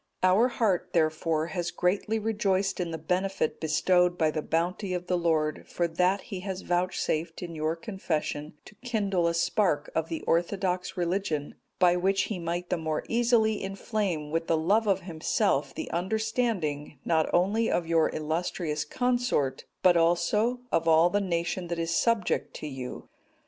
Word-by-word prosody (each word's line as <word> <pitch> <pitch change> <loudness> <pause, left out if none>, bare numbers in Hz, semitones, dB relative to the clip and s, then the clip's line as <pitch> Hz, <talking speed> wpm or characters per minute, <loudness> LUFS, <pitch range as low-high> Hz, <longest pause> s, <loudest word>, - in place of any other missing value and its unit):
Our 190 +6 +5
heart, 215 -7 0
therefore, 160 -1 +1
has 175 -2 -1
greatly 195 +5 0
rejoiced 200 -3 0
in 175 -2 -1
the 165 - -4
benefit 180 +2 -1
bestowed 180 +3 +2
by 155 -1 +2
the 155 - -2
bounty 180 +4 -1
of 180 0 -4
the 180 - 0
Lord, 160 -3 0
for 175 - -1
that 180 +4 +1
He 195 -4 -6
has 190 0 -5
vouchsafed, 175 -2 -1
in 170 -1 -6
your 155 +1 -1
confession, 165 -6 -3
to - - -13
kindle 200 -8 0
a 170 - 0
spark 170 -3 +1
of 160 0 -1
the 165 - -3
orthodox 180 +2 0
religion, 170 -4 -1 0.2
by 180 -1 +4
which 195 +2 +2
He 205 -5 -4
might 175 +1 -3
the 180 - +2
more 160 -1 -2
easily 230 -2 +2
inflame 195 -5 -2
with 165 +1 -1
the 165 - +2
love 205 +8 +2
of 195 -1 +2
Himself 170 - 0
the - - -5
understanding, 190 - -1
not 160 -2 +2
only 205 +6 +2
of 175 - 0
your 165 -1 +3
illustrious 155 0 -2
consort, 245 - 0 0.2
but 180 -1 +6
also 175 +9 +2
of 165 0 +1
all 165 +2 +5
the 205 - +2
nation 175 -1 -2
that 170 0 -3
is 165 0 -1
subject 230 -3 +1
to - - -6
you. 130 -3 -7
175 Hz, 165 wpm, -28 LUFS, 160-195 Hz, 0.2 s, but